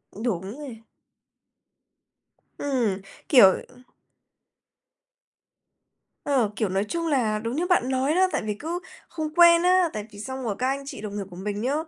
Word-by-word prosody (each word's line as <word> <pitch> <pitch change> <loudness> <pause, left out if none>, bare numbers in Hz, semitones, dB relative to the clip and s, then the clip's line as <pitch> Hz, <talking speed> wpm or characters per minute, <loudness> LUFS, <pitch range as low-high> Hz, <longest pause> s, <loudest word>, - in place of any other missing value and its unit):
Đúng 205 0 -3
nè. 245 -7 -9 1.8
Ừm, 240 -9 -1 0.3
kiểu, 240 -9 +8 0.2
ừm 250 0 -19 2.4
Ờ, 255 -7 +1
kiểu, 215 -4 -1
nói 195 +2 0
chung 335 +10 -3
là 230 -8 +1
đúng 230 +4 -4
như 345 +3 -1
bạn 345 -9 +2
nói 265 +4 +1
đó, 375 +1 +4
tại 300 - -1
vì 210 - -1
cứ 325 +10 -4 0.3
không 310 -2 -4
quen 340 0 +7
á, 365 -1 +4
tại 210 -1 -5
vì 205 - -12
xong 260 +3 -6
rồi 215 -5 -2
các 255 - +1
anh 275 +1 -2
chị 245 - -8
đồng 205 -1 -6
nghiệp 200 - -3
của 175 - -12
mình 205 +2 -4
nhá, 260 +4 0
250 Hz, 165 wpm, -25 LUFS, 210-305 Hz, 2.4 s, kiểu